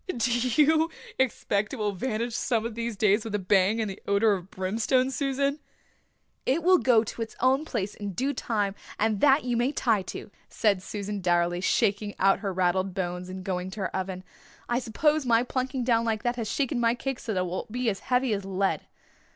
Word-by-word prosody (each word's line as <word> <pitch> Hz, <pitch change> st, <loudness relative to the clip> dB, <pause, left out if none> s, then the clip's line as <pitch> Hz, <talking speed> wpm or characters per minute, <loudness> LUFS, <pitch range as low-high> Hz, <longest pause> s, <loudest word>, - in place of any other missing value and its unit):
"Do 235 Hz, +1 st, +1 dB, 0.2 s
you 310 Hz, +5 st, +4 dB, 0.3 s
expect 210 Hz, -4 st, 0 dB
it -, -, -2 dB
will 210 Hz, -4 st, -1 dB
vanish 230 Hz, +3 st, -2 dB
some 230 Hz, -2 st, 0 dB
of 230 Hz, -, -3 dB
these 230 Hz, -1 st, -4 dB
days 210 Hz, +1 st, +3 dB
with 220 Hz, -3 st, -4 dB
a -, -, +3 dB
bang 195 Hz, +2 st, +2 dB
and 220 Hz, -, 0 dB
the 195 Hz, 0 st, -7 dB
odour 205 Hz, +2 st, +4 dB
of 185 Hz, -1 st, -5 dB
brimstone, 225 Hz, +8 st, 0 dB
Susan?" 280 Hz, +1 st, 0 dB, 0.8 s
"It 290 Hz, +6 st, +1 dB
will 365 Hz, 0 st, +6 dB
go 235 Hz, -4 st, +4 dB
to 230 Hz, -, -7 dB
its 225 Hz, -, -5 dB
own 265 Hz, +4 st, +3 dB
place 200 Hz, -7 st, -3 dB
in 205 Hz, -1 st, -6 dB
due 270 Hz, +9 st, -1 dB
time 210 Hz, -6 st, -1 dB, 0.2 s
and 215 Hz, -1 st, 0 dB
that 285 Hz, +1 st, +5 dB
you 245 Hz, -1 st, -1 dB
may 240 Hz, +4 st, +1 dB
tie 230 Hz, -8 st, +1 dB
to," 190 Hz, -, -8 dB, 0.2 s
said 200 Hz, -4 st, +1 dB
Susan 205 Hz, +1 st, -5 dB
dourly, 175 Hz, 0 st, +1 dB
shaking 205 Hz, +1 st, +1 dB
out 195 Hz, 0 st, +3 dB
her 200 Hz, -2 st, -2 dB
raddled 185 Hz, +1 st, 0 dB
bones 180 Hz, -1 st, -3 dB
and 185 Hz, 0 st, -7 dB
going 185 Hz, -1 st, -3 dB
to 200 Hz, +2 st, -7 dB
her 190 Hz, -, -3 dB
oven. 185 Hz, -1 st, -3 dB, 0.4 s
"I 240 Hz, +1 st, +1 dB
suppose 295 Hz, +6 st, +1 dB
my 230 Hz, 0 st, +4 dB
plunking 255 Hz, 0 st, -2 dB
down 230 Hz, -2 st, +2 dB
like 220 Hz, -2 st, -1 dB
that 240 Hz, 0 st, 0 dB
has 230 Hz, -3 st, -3 dB
shaken 270 Hz, -3 st, 0 dB
my 230 Hz, 0 st, +2 dB
cake 270 Hz, +1 st, -4 dB
so 220 Hz, -, -4 dB
that 185 Hz, -, +1 dB
it -, -, +1 dB
will 180 Hz, +1 st, -4 dB
be 245 Hz, +2 st, -2 dB
as 195 Hz, -3 st, 0 dB
heavy 250 Hz, -2 st, +1 dB
as 200 Hz, -1 st, -2 dB
lead." 195 Hz, 0 st, 0 dB
220 Hz, 210 wpm, -27 LUFS, 195-250 Hz, 0.8 s, will